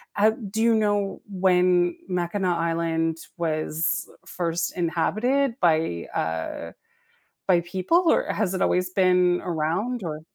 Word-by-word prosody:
uh, 210 +2 +4 0.2
do 220 +2 -1
you 230 0 +4
know 205 -2 0
when 180 -2 +2
Mackinac 180 0 -1
Island 165 -1 0 0.2
was 160 -1 -1 0.2
first 170 0 -3
inhabited 225 +10 +1
by, 160 - +1
uh 80 0 -3 0.8
by 180 -3 +4
people 190 - +1
or - - +1
has 200 -3 -1
it 185 - -1
always 180 0 +1
been 180 -1 +3
around 180 +8 -2
or 155 -2 -4
180 Hz, 120 wpm, -24 LUFS, 165-200 Hz, 0.8 s, uh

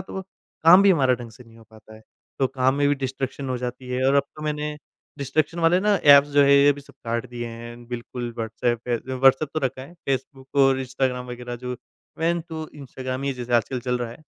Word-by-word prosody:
तो 190 +1 -6 0.4
काम 180 +4 +9
भी 200 - +6
हमारा 135 -8 +4
ढंग 120 -1 -9
से 120 +3 -15
नहीं 115 0 -18
हो 115 - -16
पाता 110 0 -16
है। 110 - -14 0.4
तो 135 - +3
काम 130 0 +1
में 145 0 +2
भी 145 - +3
डिस्ट्रैक्शन 135 0 -4
हो 130 - -1
जाती 125 +1 -6
है 125 +1 -1
और 135 - +3
अब 140 - +5
तो 150 - -8
मैंने 150 0 -3 0.4
डिस्ट्रैक्शन 145 +4 -1
वाले 170 +2 +4
ना 210 +1 +3
ऐप्स 145 -4 +7
जो 145 0 +5
है 140 0 +6
ये 140 +1 +6
भी 145 - -10
सब 140 -1 -18
काट 115 +1 -2
दिए 120 -1 -5
हैं, 120 +1 -10
बिल्कुल 120 0 -5
वॉट्सऐप 115 +1 -1
है 120 -1 +1
जो 130 0 -4
वॉट्सऐप 135 +3 +5
तो 155 - 0
रखा 130 -1 -2
है 140 +6 -12
फ़ेसबुक 135 0 -3 0.2
और 135 0 +3
इंस्टाग्राम 130 -1 -2
वगैरह 120 0 -6
जो 125 +1 -5 0.4
मेन 170 +2 +1
तो 160 -1 -6
इंस्टाग्राम 130 -2 -6
ही 140 0 -1
जैसे 125 -1 -6
आजकल 120 +2 +1
चल 125 0 -1
रहा 120 -1 -4
है, 115 - -10
130 Hz, 235 wpm, -24 LUFS, 120-145 Hz, 0.4 s, काम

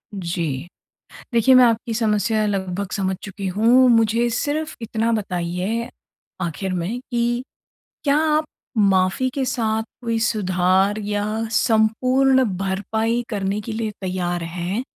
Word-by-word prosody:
जी। 170 -5 -3 0.7
देखिए 235 +3 +5
मैं 255 - +8
आपकी 230 0 0
समस्या 215 -1 +1
लगभग 195 -1 -2
समझ 190 -2 -1
चुकी 200 -1 -5
हूँ। 230 +7 +4
मुझे 230 +1 +3
सिर्फ़ 295 +6 -2
इतना 225 +1 -1
बताइए 190 +3 -2 0.5
आखिर 185 +2 -3
में 185 +7 -2
कि 240 +1 0 0.6
क्या 285 -1 +3 0.2
आप 310 - +1 0.3
माफ़ी 195 +4 +3
के 275 - 0
साथ 225 -4 0 0.2
कोई 230 -1 -1
सुधार 190 -2 +2
या 205 -1 -2 0.3
संपूर्ण 255 +5 +3
भरपाई 220 +5 -1
करने 200 -2 -2
के 225 +2 -6
लिए 220 0 -2
तैयार 180 -2 -2
हैं? 175 +6 -3
215 Hz, 125 wpm, -21 LUFS, 190-235 Hz, 0.7 s, मैं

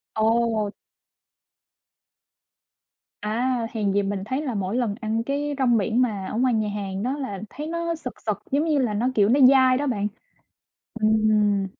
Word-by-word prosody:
Ồ! 220 -1 +1 2.5
À, 225 +5 -1 0.2
hèn 210 -3 0
gì 205 - +2
mình 195 -1 -3
thấy 260 +6 -2
là 270 -5 -3
mỗi 195 +2 -2
lần 235 -5 0
ăn 225 +1 -1
cái 285 +2 -2
rong 245 -3 +3
biển 220 +4 +1
mà 210 -6 -1
ở 220 - -4
ngoài 255 0 +2
nhà 215 -2 0
hàng 195 -1 -4
đó 265 +4 -1
là 205 -9 -5
thấy 300 +1 -7
nó 335 0 -2
sực 250 -6 -8
sực 215 -2 -3
giống 290 +3 +2
như 305 -3 +2
là 235 -5 0
nó, 230 +5 0
kiểu, 205 0 +4
nó 270 - +4
dai 260 -2 +5
đó 285 +1 -1
bạn. 205 -4 0 0.9
Ừm. 215 -2 +2
225 Hz, 175 wpm, -24 LUFS, 210-260 Hz, 2.5 s, dai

